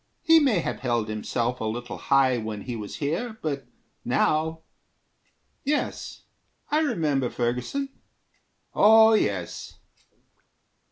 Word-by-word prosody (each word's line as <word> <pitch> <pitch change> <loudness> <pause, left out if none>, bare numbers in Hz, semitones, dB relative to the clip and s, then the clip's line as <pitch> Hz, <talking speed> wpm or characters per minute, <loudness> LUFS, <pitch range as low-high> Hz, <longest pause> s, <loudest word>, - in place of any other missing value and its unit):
He 325 0 +7
may 250 - +2
have - - -4
held 120 -4 -1
himself 120 +3 -2
A - - -4
little 120 +3 -4
high 130 -3 +3
when 110 -2 -5
he 120 +2 -5
was 105 -3 -6
here, 215 +11 -3
but 140 -3 -3 0.4
now... 160 +1 0 1.0
Yes, 290 +1 -2 0.5
I 300 - +3
remember 150 - 0
Ferguson. 125 - -2 0.8
Oh, 220 +1 +7
yes." 95 - -1
135 Hz, 110 wpm, -25 LUFS, -, 1.0 s, He